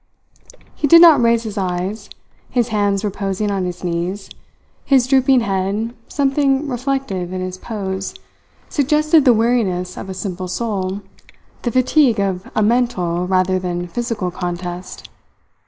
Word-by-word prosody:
He 290 - -1
did 335 +4 +8
not 325 -6 +8
raise 230 -1 +3
his 215 -2 -4
eyes. 190 +3 -3 0.4
His 240 -1 0
hands 205 -1 0
reposing 200 0 -2
on 195 -2 -1
his 180 0 -6
knees, 180 +3 -3 0.5
his 265 -3 +3
drooping 265 -1 +4
head, 200 +2 -1
something 275 0 +1
reflective 250 -8 -2
in 185 - -4
his 185 0 -5
pose, 195 -4 -5 0.5
suggested 300 +1 +2
the 255 - +7
weariness 215 -6 0
of 195 - -7
a 190 - -5
simple 185 -1 -4
soul, 195 -1 -3 0.6
the 240 - -2
fatigue 255 -1 +3
of 190 -2 -2
a 215 - +2
mental 185 -7 0
rather 185 0 +2
than 175 -1 -3
physical 210 -1 -3
contest. 175 0 -6
205 Hz, 140 wpm, -19 LUFS, 185-245 Hz, 0.6 s, did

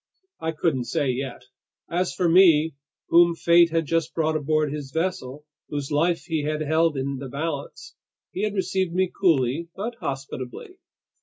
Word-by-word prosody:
I 160 0 -2
couldn't 150 -6 0
say 130 +3 0
yet. 130 0 -5 0.4
As 175 +2 -1
for 180 - +1
me, 165 -3 +5 0.4
whom 170 0 +5
fate 170 0 +5
had 165 0 0
just 165 +1 -1
brought 160 -1 +1
aboard 155 0 0
his 145 -3 -6
vessel, 150 -3 -3 0.2
whose 145 -1 -4
life 165 +4 +1
he 160 -3 -2
had 155 +1 -2
held 160 0 +2
in 135 +1 -2
the 135 0 -7
balance: 155 - -5 0.4
he 190 - -4
had 210 -1 -1
received 190 -2 -1
me 185 -1 +1
coolly 160 -3 +1
but 220 +5 -4
hospitably. 135 - -6
160 Hz, 160 wpm, -24 LUFS, 140-170 Hz, 0.4 s, me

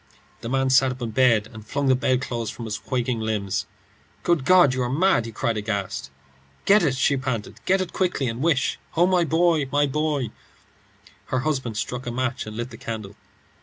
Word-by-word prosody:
The 115 - -6
man 135 0 +1
sat 130 0 +5
up 130 - -13
in 115 - -3
bed 115 -3 +3
and 110 -1 -10
flung 140 +6 -2
the 130 - +5
bedclothes 125 -3 -1
from 115 - -7
his 105 -1 -4
quaking 125 -2 -2
limbs. 105 -3 -2 0.6
"Good 170 -6 +1
God, 175 -5 +6
you 130 - -1
are 120 - 0
mad!" 150 -4 +2
he - - -7
cried, 115 +1 -1
aghast. 100 -3 -3 0.6
"Get 210 +2 +6
it," 140 -5 +1
she 140 +2 +2
panted; 130 -5 -4
"get 190 +1 +3
it 185 - -4
quickly, 180 -8 0
and 115 +2 -3
wish 145 -4 +1 0.2
Oh, 175 - +6
my 180 -1 +3
boy, 165 -3 +2
my 145 0 +3
boy!" 145 -4 -1 1.0
Her 130 - 0
husband 130 -7 -2
struck 125 +3 -4
a - - -1
match 125 -2 -2
and 110 0 -7
lit 120 +2 -4
the 115 - -9
candle. 110 -4 -6
130 Hz, 200 wpm, -24 LUFS, 115-145 Hz, 1.0 s, God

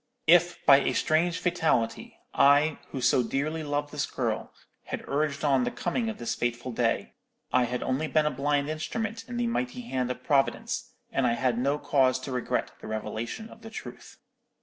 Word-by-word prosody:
If, 175 +1 +4
by 140 - +9
a 140 - +1
strange 165 +2 +2
fatality, 160 -10 0 0.2
I, 145 +2 +4
who 130 - -5
so 125 - +4
dearly 145 +6 -2
loved 145 -1 -2
this - - -2
girl, - - -2 0.3
had - - -6
urged 145 0 -1
on 135 -3 +3
the - - 0
coming 225 +6 -2
of 220 - -5
this 115 0 -2
fatal 120 +1 -2
day, 115 -1 0 0.4
I 125 -1 +4
had 125 +1 -3
only 135 +5 0
been 155 0 +2
a 150 - +2
blind 140 +2 0
instrument 220 +9 -3
in 245 -1 -5
the 240 - +1
mighty 245 +1 -2
hand 130 - -2
of 125 0 -5
Providence, 225 - 0 0.2
and 135 - +2
I 120 - +2
had 120 0 0
no 140 +3 +1
cause 130 -3 +2
to 135 - -6
regret 125 -2 -1
the - - -8
revelation 110 - -4
of - - -14
the 225 - -9
truth. - - -9
145 Hz, 190 wpm, -28 LUFS, 125-170 Hz, 0.4 s, by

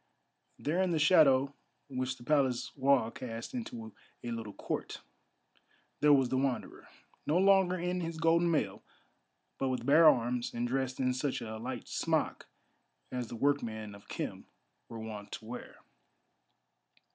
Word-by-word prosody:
There, 165 +6 0
in 190 - +2
the 165 - +1
shadow 145 -4 +5 0.3
which 130 -1 -3
the 120 - -13
Palace 130 -3 +1
wall 135 -4 +3
cast 115 - -7
into 120 - -6 0.3
a 120 - -4
little 115 -3 -5
court, - - -5 1.0
there 150 - +5
was 135 -3 +5
the 130 - +1
Wanderer; 135 -2 -2 0.4
no 155 +4 +3
longer 190 -1 +4
in 180 +1 -2
his 165 -1 -4
golden 165 +1 +3
mail, 110 -12 0 0.8
but 135 - 0
with 125 -2 -2
bare 155 +4 +8
arms, 120 -2 0
and 120 +1 -1
dressed 130 0 -2
in 130 -1 +2
such 130 +1 -1
a 110 -2 -6
light 125 +2 -5
smock - - -1 0.6
as 125 -2 -3
the 120 - -7
workmen 115 -5 -1
of 100 0 -14
Khem - - -5 0.4
were 115 - -7
wont 110 -2 -7
to 110 - -7
wear. 120 +2 -8
130 Hz, 150 wpm, -32 LUFS, 120-150 Hz, 1.0 s, bare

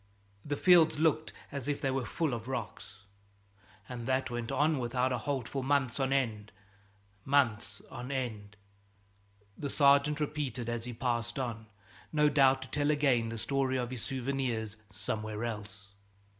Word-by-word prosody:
The 145 - -2
fields 165 -3 +6
looked 155 0 +2 0.2
as 140 -2 -4
if 145 -1 0
they 135 - 0
were 130 -2 -1
full 160 -1 -1
of 115 0 -5
rocks. 105 -5 -6 0.8
And 120 -1 -6
that 130 -1 0
went 120 0 -3
on 150 +2 +2
without 125 +1 0
a 125 - 0
halt 130 -2 -2
for 135 -2 -3
months 135 -2 +1
on 135 0 +1
end, 110 -6 0 0.7
months 130 -5 +1
on 125 0 -6
end!" 110 -6 -4 1.0
the 145 - -4
sergeant 140 +1 +4
repeated 140 -6 -2
as 120 -1 -2
he 125 - -5
passed 120 0 -1
on, 115 -4 -3 0.4
no 150 -1 +4
doubt 135 -2 +4
to - - -10
tell 145 0 0
again 135 -6 +3
the 115 - -5
story 130 +4 0
of 125 -1 -2
his 125 -3 -4
souvenirs 125 -5 -2
somewhere 105 +2 -3
else. 105 -3 -6
130 Hz, 155 wpm, -31 LUFS, 115-140 Hz, 1.0 s, fields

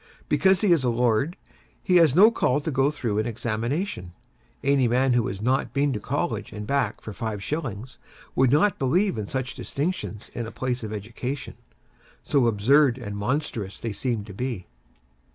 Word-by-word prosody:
Because 190 -1 +3
he 205 -4 +3
is 165 -6 +4
a 125 - +2
lord, 120 +6 +1 0.5
he 180 - +4
has 160 -5 +5
no 210 +6 +8
call 135 - +1
to 160 - -3
go 135 +1 +3
through 115 -8 -2
an 110 - 0
examination. 115 - -3 0.5
Any 140 -2 +3
man 125 +2 +2
who 120 -2 +2
has 95 +2 -5
not 130 +3 +1
been 140 0 +2
to 105 - -2
College - - -2
and 105 0 -6
back 130 -3 0
for 110 - -7
five 110 -3 -4
shillings, 130 -4 -4 0.4
would 130 -1 +4
not 180 +8 +3
believe 180 +10 +2
in 105 - -4
such 130 0 -3
distinctions 145 - -4
in 120 -1 -4
a - - -8
place 125 +1 -2
of 110 -2 -5
education, 120 +6 -5 0.7
so 135 -4 +2
absurd 125 +5 +4
and 105 -5 -6
monstrous 105 -3 -2
do 115 - -3
they - - -4
seem 115 0 -2
to 100 - -10
be. 115 -3 -4
125 Hz, 185 wpm, -25 LUFS, 110-140 Hz, 0.7 s, no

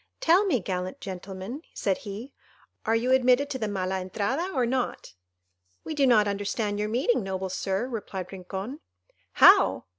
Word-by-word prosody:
"Tell 360 +5 +4
me, 265 -10 +2
gallant 185 +5 -4
gentlemen," 190 - -7
said 195 -2 0
he, 215 +7 -8 0.5
"are 225 - +3
you 240 +3 +1
admitted 260 +2 +4
to 260 - -3
the 215 - -1
Mala 190 -2 -2
Entrada, 220 - -2
or 255 -7 +1
not?" 250 - -2 0.7
"We - - -5
do 285 -3 +3
not 215 -4 +5
understand 205 +1 -2
your 210 0 -1
meaning, 245 +1 +1
noble 190 -1 -3
Sir," 195 +5 -2
replied 205 -6 -6
Rincon. 195 - -6 0.5
"How! - - +6
210 Hz, 155 wpm, -27 LUFS, 190-255 Hz, 0.7 s, How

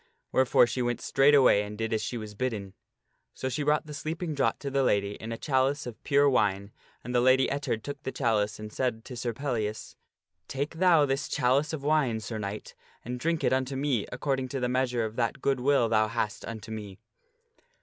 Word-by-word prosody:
Wherefore 130 -1 +5
she 125 +2 -3
went 120 0 -1
straightway 135 -6 +5
and 105 0 -6
did 115 0 -2
as 110 - 0
she 120 - -3
was 110 -2 -7
bidden. 105 -4 -3 0.6
So 130 - -3
she 130 +4 -2
brought 150 +1 +2
the 150 - -8
sleeping 160 +2 -4
draught 140 -2 0
to 140 - -4
the 135 0 +2
lady 100 -5 +2
in 110 +2 -7
a 115 - -3
chalice 140 +1 +1
of 120 -3 -9
pure 140 0 +4
wine, 100 -6 +1 0.3
and 125 - -5
the 120 - +3
Lady 130 +1 +4
Ettard 135 -6 -2
took 145 0 -6
the 130 - -4
chalice 110 -6 0
and 105 0 -8
said 120 -3 -2
to 125 - -8
Sir 120 0 -2
Pellias, 110 -4 -3 0.3
" 80 +2 -54
Take 145 +4 -2
thou 175 -5 +5
this 135 +1 -1
chalice 135 +4 +2
of 155 -4 -5
wine, 145 -7 +2
Sir 110 0 -5
Knight, 100 0 -6 0.3
and 125 +1 -4
drink 165 +3 -1
it - - +3
unto 130 +1 -1
me 135 -6 0
according 130 0 -1
to 135 +1 -4
the 125 - 0
meas 130 0 +1
ure 120 -2 0
of 110 +1 -7
that 115 +1 0
good 135 -1 +1
will 135 -2 +3
thou 110 -1 +3
hast 110 -3 -3
unto 110 -1 -7
me." 105 -3 -7
125 Hz, 215 wpm, -28 LUFS, 110-140 Hz, 0.6 s, Wherefore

